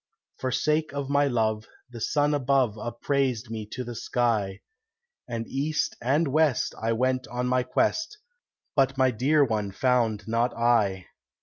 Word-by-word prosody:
For 130 - -2
sake 150 +3 0
of 140 -1 -3
my 145 0 +3
love, 110 -3 0 0.2
the 120 -2 -9
sun 145 +5 +1
above 135 -5 +2
Upraised 120 +1 -2
me 110 -2 -5
to 125 +4 -5
the 120 0 -6
sky, 115 -4 -1 0.7
And 115 -1 -4
east 150 +3 -1
and 145 +7 +2
west 150 -3 +2
I 115 +1 0
went 130 +2 0
on 125 +1 -3
my 125 0 +2
quest, 320 - 0 0.6
But 135 -1 +2
my 130 -1 +4
dear 140 +6 +3
one 105 -4 -2
found 115 -1 +1
not 115 +2 0
I. 105 -6 +2
125 Hz, 150 wpm, -26 LUFS, 115-140 Hz, 0.7 s, my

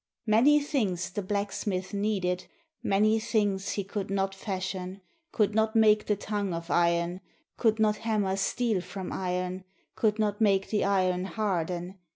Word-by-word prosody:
Many 245 +7 +5
things 200 - -1
the 205 - -3
blacksmith 200 -1 -2
needed, 195 -3 -1 0.3
Many 215 +3 +3
things 205 -3 0
he 200 - -2
could 195 0 -4
not 195 0 0
fashion, 190 -1 -4 0.3
Could 210 -2 +1
not 220 +1 +1
make 215 -1 +4
the 210 - +2
tongue 205 -3 -2
of 170 +1 -6
iron 170 +1 +1 0.3
Could 220 -2 +2
not 215 -1 +3
hammer 210 -4 0
steel 215 +1 0
from 185 +1 -6
iron. 180 0 -2 0.3
Could 215 -1 +1
not 210 -1 0
make 195 -2 +3
the 215 - +2
iron 185 -2 +1
harden. 185 -3 -2
200 Hz, 150 wpm, -28 LUFS, 185-215 Hz, 0.3 s, Many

